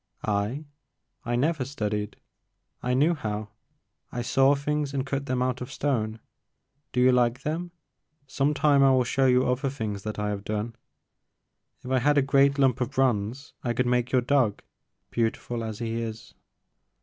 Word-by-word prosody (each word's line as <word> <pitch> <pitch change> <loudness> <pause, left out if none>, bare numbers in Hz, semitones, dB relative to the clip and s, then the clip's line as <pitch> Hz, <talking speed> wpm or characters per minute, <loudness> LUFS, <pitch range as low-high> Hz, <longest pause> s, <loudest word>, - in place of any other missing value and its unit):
*'I? 105 +8 -1 0.6
I 120 - 0
never 150 +3 +1
studied, 105 -6 -3 0.3
— - - -51
I 125 - +2
knew 150 +6 +4
how. 105 -7 -4 0.6
I 120 - -3
saw 135 +3 +4
things 145 0 -2
and 135 -1 -1
cut 140 +1 -3
them 125 0 0
out 130 0 -1
of 125 +1 -6
stone. 115 -7 -1 0.7
Do 125 - -1
you 130 +1 +6
like 125 +1 +2
them? 165 +4 -2 0.6
Some 140 +2 0
time 145 -2 +4
I 135 - +6
will 130 -1 +4
show 135 +2 +2
you 125 0 +4
other 130 +2 0
things 110 -6 -4
that 105 +1 -5
I 105 0 -1
have 100 -1 -3
done. 110 +2 -3 1.1
If 130 - -5
I 130 - +3
had 145 +3 +3
a 140 - +5
great 140 +1 +4
lump 135 -2 +3
of 125 - 0
bronze 125 0 0
I 120 - 0
could 125 +2 0
make 125 0 +1
your 130 - +4
dog, 125 -5 +1 0.5
beautiful 115 0 -1
as 110 -2 -5
he 115 0 -3
is." 110 -1 -7
125 Hz, 175 wpm, -26 LUFS, 115-140 Hz, 1.1 s, you